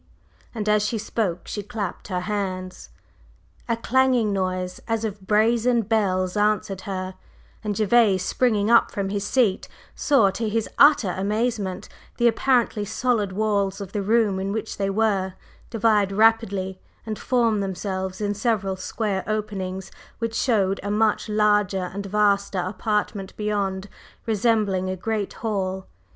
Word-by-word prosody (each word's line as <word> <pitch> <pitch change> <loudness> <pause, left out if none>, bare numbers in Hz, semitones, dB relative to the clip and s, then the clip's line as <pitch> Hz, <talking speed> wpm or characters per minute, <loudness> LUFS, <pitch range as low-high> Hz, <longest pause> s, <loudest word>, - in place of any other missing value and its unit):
and 215 -2 -3
as 210 0 +3
she 225 +2 -1
spoke 210 -5 -2
she 205 - -4
clapped 205 -3 -5
her 180 -2 -2
hands. 185 -2 -4 0.8
A 230 - +1
clanging 245 -3 +2
noise 185 -1 -2
as 225 -1 -1
of 200 -3 -6
brazen 230 +3 +3
bells 190 -4 0
answered 205 -2 0
her, 185 -1 -3 0.5
and 210 -1 -2
Gervase, 210 -3 +3
springing 220 -4 +1
up 235 - +6
from 195 -1 -3
his 200 0 -2
seat, 205 -3 +1 0.3
saw, 230 -10 +3
to 220 +3 -2
his 225 +1 -1
utter 285 -10 +6
amazement, 205 -1 -1 0.3
the 240 - +4
apparently 235 -2 +2
solid 215 -1 0
walls 200 -1 0
of 195 -2 -7
the 205 - -2
room 210 -1 +2
in 195 +1 -2
which 220 +1 -4
they 195 -1 0
were, 195 -3 0 0.3
divide 215 -3 +2
rapidly 200 -3 +2 0.2
and 215 -2 -4
form 235 -4 +1
themselves 190 -1 -3
in 205 0 0
several 205 -3 0
square 190 +1 -2
openings 195 -3 -3 0.3
which 230 -1 -3
showed 200 -5 +1
a 205 - -4
much 215 +1 +1
larger 210 -3 +2
and 200 0 -5
vaster 200 -1 +1
apartment 205 +1 -2
beyond, 200 -2 -2 0.4
resembling 210 -4 +1
a 185 - -2
great 215 +1 -2
hall. 190 -3 -2
205 Hz, 140 wpm, -24 LUFS, 190-225 Hz, 0.8 s, up